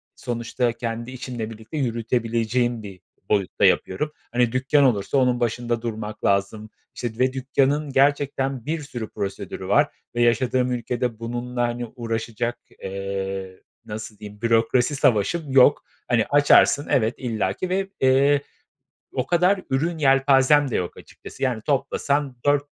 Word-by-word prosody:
sonuçta 120 0 -2
kendi 115 +1 -5
işimle 120 -3 -5
birlikte 110 +7 -8
yürütebileceğim 115 -1 0
bir 95 -2 -10 0.3
boyutta 100 -3 +1
yapıyorum. 150 +11 +1 0.2
Hani, 120 -1 +2
dükkân 135 +3 +2
olursa 115 0 +2
onun 125 -2 +2
başında 120 0 -1
durmak 110 -2 -5
lazım. 100 +2 0 0.3
İşte, 120 -1 -5
ve 130 0 +2
dükkânın 135 +3 0
gerçekten 135 -2 +1
bir 160 0 -2
sürü 120 -6 -6
prosedürü 100 -1 -5
var - - +3 0.2
ve 120 - +1
yaşadığım 125 +2 +2
ülkede 120 -1 -2
bununla, 120 +1 -4
hani, 120 0 -1
uğraşacak, 115 0 -3 0.3
eee, 95 -1 -4 0.2
nasıl 105 0 -7
diyeyim, 105 0 -11
bürokrasi 115 +4 +2
savaşım 135 - +1
yok. 135 +2 +5 0.2
Hani, 115 -3 +2
açarsın, 145 0 +5
evet, 115 -2 +2
illaki 115 - -2
ve, 195 +1 -1
eee, 135 +2 +4 0.7
o 130 - -1
kadar 180 +3 +3
ürün 160 +6 0
yelpazem 135 0 +4
de - - -1
yok 90 - -3
açıkçası. - - -10
Yani 120 -4 0
toplasan 140 0 0
4, 145 0 +3
120 Hz, 135 wpm, -23 LUFS, 110-135 Hz, 0.7 s, yok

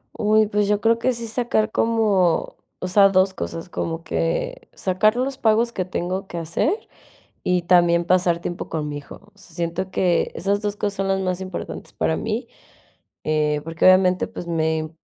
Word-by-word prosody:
Uy, 215 0 +3
pues, 210 -1 0
yo 205 0 +2
creo 230 +1 +2
que 255 +2 +2
sí 235 -1 -5
sacar 220 -1 0
como 210 -8 +1 0.2
o 185 - -3
sea, 195 +2 +6
2 190 0 +3
cosas. 165 -1 -5
Como 165 -1 -4
que 165 0 -2
sacar 195 +4 +2
los 260 +2 -2
pagos 225 +1 +3
que 185 - -2
tengo 185 +1 -3
que 175 - -7
hacer, 170 - -1 0.6
y 180 -1 +1
también 175 -1 +4
pasar 175 -1 +2
tiempo 175 0 -5
con 155 -2 -3
mi 145 - -4
hijo. 145 - -10 0.2
O - - -27
sea, 185 -4 -15
siento 175 +2 -3
que 180 -2 +1
esas 200 +2 -1
2 205 -1 -2
cosas 205 -1 -2
son 195 0 -1
las 195 0 +1
más 185 0 -2
importantes 185 -1 -7
para - - 0
mí, - - -3 0.8
eh, 150 -1 +1
porque 165 +1 -1
obviamente, 185 0 +5
pues, 175 - -8
me 160 -1 0
185 Hz, 185 wpm, -22 LUFS, 170-210 Hz, 0.8 s, sea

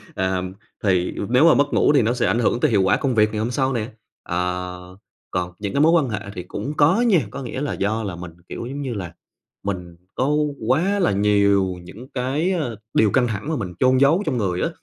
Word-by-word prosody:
À, 95 -1 0 0.4
thì 90 -3 +2 0.2
nếu 130 +7 +5
mà 165 - +7
mất 145 0 +1
ngủ 150 - +4
thì 140 - +5
nó 115 +1 +1
sẽ 125 -1 0
ảnh 120 - +1
hưởng 120 +1 +1
tới 150 -3 +2
hiệu 100 -3 +3
quả 95 - +3
công 130 -4 -1
việc 105 0 +4
ngày 105 - -3
hôm 115 +3 -1
sau 135 0 0
nè. 115 -2 -2 0.4
Ờ, 90 +1 -4 0.3
còn 90 -1 -2
những 100 -1 -4
cái 140 - +2
mối 160 - +5
quan 160 -7 +3
hệ 105 - -2 0.2
thì 90 - -5
cũng 140 +10 -5
có 160 +10 +4
nha. 225 -8 +4
Có 140 - -6
nghĩa 130 +3 -5
là 145 - -2
do 110 +3 -1
là 95 -4 -4
mình 85 -1 -8 0.2
kiểu - - -6
giống 140 +3 -5
như 130 -4 -3
là 90 -5 -6 0.5
mình 90 -4 -4 0.2
có 130 +2 0 0.4
quá 185 +10 +2
là 180 - +2
nhiều 100 -2 +2
những 110 +8 -11
cái, 140 +8 0
ơ, 150 -11 -2 0.2
điều 105 -3 +3
căng 125 -2 +3
thẳng 110 +7 -4
mà 160 - 0
mình 95 -8 -4
chôn 130 0 +4
giấu 155 +8 +4
trong 130 -5 -1
người 90 -4 -1
á, - - +1
115 Hz, 240 wpm, -22 LUFS, 95-140 Hz, 0.5 s, mà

